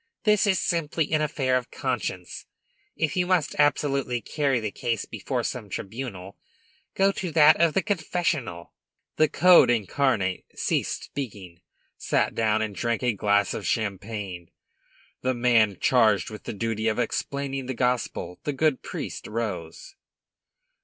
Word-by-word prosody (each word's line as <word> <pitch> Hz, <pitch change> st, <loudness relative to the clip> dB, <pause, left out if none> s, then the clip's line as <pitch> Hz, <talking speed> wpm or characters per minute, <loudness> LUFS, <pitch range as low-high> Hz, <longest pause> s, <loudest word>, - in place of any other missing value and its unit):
This 210 Hz, -1 st, +3 dB
is 190 Hz, -2 st, +3 dB
simply 165 Hz, -2 st, -1 dB
an 155 Hz, -1 st, +2 dB
affair 135 Hz, -4 st, 0 dB
of 125 Hz, -1 st, -5 dB
conscience. 115 Hz, -8 st, -4 dB, 0.5 s
If 155 Hz, -3 st, -1 dB
you 180 Hz, -1 st, +1 dB
must 180 Hz, -6 st, +1 dB
absolutely 140 Hz, -4 st, +2 dB
carry 135 Hz, +2 st, 0 dB
the 110 Hz, -2 st, -3 dB
case 115 Hz, 0 st, -2 dB
before -, -, -3 dB
some -, -, -4 dB
tribunal, 100 Hz, -4 st, -6 dB, 0.6 s
go 195 Hz, +1 st, +4 dB
to 190 Hz, -2 st, -4 dB
that 155 Hz, 0 st, +6 dB
of 165 Hz, -2 st, +3 dB
the 195 Hz, -, +2 dB
confessional." 160 Hz, -, -2 dB, 0.4 s
The 155 Hz, -, +4 dB
Code 180 Hz, -6 st, +6 dB
incarnate 110 Hz, -4 st, +1 dB
ceased -, -, -1 dB
speaking, 100 Hz, -10 st, -7 dB, 0.4 s
sat -, -, +1 dB
down, 110 Hz, -1 st, +1 dB
and 105 Hz, -2 st, -4 dB
drank 115 Hz, +3 st, -2 dB
a 125 Hz, -2 st, +2 dB
glass 100 Hz, 0 st, +2 dB
of -, -, -4 dB
champagne. 100 Hz, -4 st, -3 dB, 0.7 s
The 130 Hz, 0 st, 0 dB
man 115 Hz, -5 st, +3 dB
charged 110 Hz, -6 st, +3 dB
with 105 Hz, -, -10 dB
the -, -, -4 dB
duty 110 Hz, +1 st, -2 dB
of 110 Hz, -, +1 dB
explaining 135 Hz, +2 st, -2 dB
the 130 Hz, -, -3 dB
gospel, 125 Hz, -7 st, -1 dB
the 145 Hz, -, -2 dB
good 150 Hz, 0 st, +1 dB
priest, -, -, -6 dB
rose. 105 Hz, -, -5 dB
125 Hz, 145 wpm, -26 LUFS, 105-150 Hz, 0.7 s, that